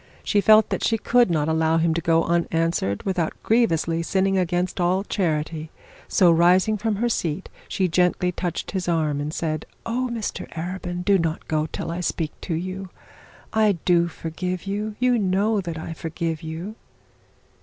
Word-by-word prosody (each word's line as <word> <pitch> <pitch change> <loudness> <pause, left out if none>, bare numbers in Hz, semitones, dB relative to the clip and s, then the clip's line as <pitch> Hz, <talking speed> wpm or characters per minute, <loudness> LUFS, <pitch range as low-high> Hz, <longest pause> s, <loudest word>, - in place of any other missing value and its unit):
She 205 - +2
felt 215 +1 +6
that - - -2
she 225 - +2
could 240 0 +3
not 155 -3 +1
allow 160 0 +2
him 165 0 +2
to 170 - -1
go 165 0 +3
unanswered 165 - 0
without 180 -4 -1
grievously 170 -8 +2
sinning 195 +3 +1
against 180 0 0
all 185 +2 +2
charity; 160 -5 -2 0.4
so, 180 -3 +5
rising 180 +5 +4
from 215 +1 -1
her 235 +4 0
seat, 175 -6 -2 0.2
she 190 - 0
gently 180 +1 +2
touched 175 -1 -4
his 185 -3 -3
arm 155 -4 0
and 150 +1 -3
said: 155 -1 -3 0.2
'Oh, 250 +2 -1
Mr 225 -3 -4
Arabin, 180 +1 -4
do 200 -2 +4
not 165 -1 -2
go 155 0 0
till - - -4
I 170 - -3
speak 165 -3 -2
to 170 - -2
you! 185 +3 -5 0.6
I 215 -2 +4
do 170 -1 +4
forgive 170 +2 -4
you. 210 +2 -3
You 250 -1 +2
know 200 +2 +1
that 170 -3 -5
I 160 +1 -5
forgive 165 0 -4
you.' 165 +6 -6
175 Hz, 170 wpm, -23 LUFS, 165-195 Hz, 0.6 s, felt